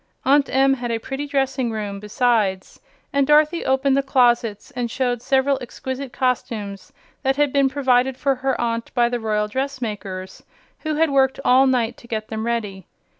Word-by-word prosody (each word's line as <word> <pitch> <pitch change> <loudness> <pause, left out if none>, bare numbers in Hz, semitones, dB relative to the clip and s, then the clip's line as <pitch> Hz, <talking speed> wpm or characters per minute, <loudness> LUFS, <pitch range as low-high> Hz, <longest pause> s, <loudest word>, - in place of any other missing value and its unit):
Aunt 280 +1 +4
Em 270 +1 +3
had 245 -2 -4
a 230 - 0
pretty 270 +5 -5
dressing 270 -3 0
room, 205 -3 -4
besides, 210 -3 0 0.3
and 280 -1 +2
Dorothy 305 +3 +4
opened 265 +1 +2
the 275 - +3
closets 240 -5 +1
and 245 -1 -3
showed 245 -1 -1
several 270 +1 +2
exquisite 260 +2 -6
costumes 220 -6 -3 0.3
that 270 0 +1
had 290 -1 +1
been 275 -1 +3
provided 260 -1 +1
for 275 0 +1
her 265 0 -2
aunt 230 -1 -2
by 240 -1 +3
the 245 0 -2
royal 210 -1 0
dressmakers, 210 -7 -5 0.4
who 310 -1 -3
had 320 0 +2
worked 265 -1 +2
all 260 +2 +5
night 240 -3 0
to 235 - -16
get 215 -2 -4
them 220 +1 -3
ready. 205 -6 -3
250 Hz, 175 wpm, -21 LUFS, 225-270 Hz, 0.4 s, all